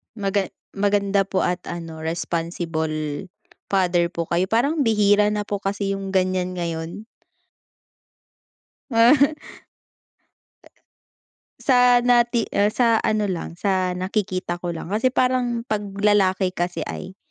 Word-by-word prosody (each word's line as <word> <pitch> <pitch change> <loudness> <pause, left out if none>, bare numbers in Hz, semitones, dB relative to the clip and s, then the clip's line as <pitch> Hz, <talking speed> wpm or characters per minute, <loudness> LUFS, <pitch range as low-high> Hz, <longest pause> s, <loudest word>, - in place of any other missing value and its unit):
Maga 200 -2 -1 0.2
maganda 200 -1 +1
po 190 - 0
at 180 0 0
ano 165 -2 -6
responsible 160 -2 -3 0.4
father 180 -3 +2
po 170 -1 -4
kayo, 180 +2 +1
parang 265 +9 +1
bihira 210 -4 +3
na 210 0 -1
po 205 -1 -3
kasi 195 0 -2
yung 195 0 -4
ganyan 185 -1 0
ngayon. 170 +4 -4 1.9
Ah. 265 +6 +5 2.3
Sa 250 -2 +5
nati 240 -2 +3
ah, 205 +1 +3
sa 230 -1 +2
ano 215 -1 +1
lang 175 -3 -4
sa 185 -2 0
nakikita 185 -2 -2
ko 175 - -3
lang, 165 - -5
kasi 215 +8 +1
parang 250 -2 0
pag 215 -4 -1 0.2
lalaki 195 -2 +2
kasi 175 0 -3
ay, 190 +1 -7
195 Hz, 120 wpm, -22 LUFS, 175-215 Hz, 2.3 s, Ah